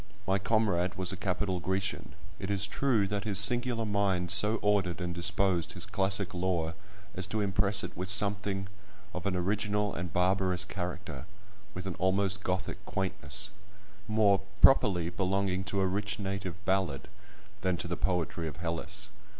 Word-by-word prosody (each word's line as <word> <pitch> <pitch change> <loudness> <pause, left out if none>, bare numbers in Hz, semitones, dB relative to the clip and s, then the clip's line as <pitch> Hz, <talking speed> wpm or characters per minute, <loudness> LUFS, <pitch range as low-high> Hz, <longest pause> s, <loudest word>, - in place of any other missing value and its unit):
My 95 +2 +2
comrade 95 -4 +1
was 95 0 0
a - - -3
capital 95 0 -1
Grecian. 95 +2 -2 0.3
It 95 - -4
is 100 -1 +2
true 115 0 +1
that 100 0 -2
his 100 -3 0
singular 120 +2 +3
mind 100 -4 +1
so 105 +2 +6
ordered 100 -4 +2
and 90 -1 -3
disposed 90 0 +1
his - - -4
classic 95 0 +1
lore 90 -3 -1 0.4
as 95 0 0
to 110 - -2
impress 100 0 +2
it - - -6
with 90 +2 -4
something 100 0 +1 0.5
of 90 +2 -4
an 95 - 0
original 105 +3 0
and 90 0 -4
barbarous 90 0 +2
character—with 100 +1 -8
an 95 - -3
almost 95 +1 +1
Gothic 95 0 -3
quaintness, 95 +3 -2 0.6
more 105 -2 +4 0.2
properly 90 -10 +5
belonging 95 0 0
to 95 +2 -1
a - - +3
rich 100 +3 -1
native 95 -3 -4
ballad 95 -7 0 0.5
than 90 -1 +1
to - - -4
the 85 - -2
poetry 85 -2 -1
of 80 - -7
Hellas. 85 -1 -2
95 Hz, 155 wpm, -30 LUFS, 90-100 Hz, 0.6 s, so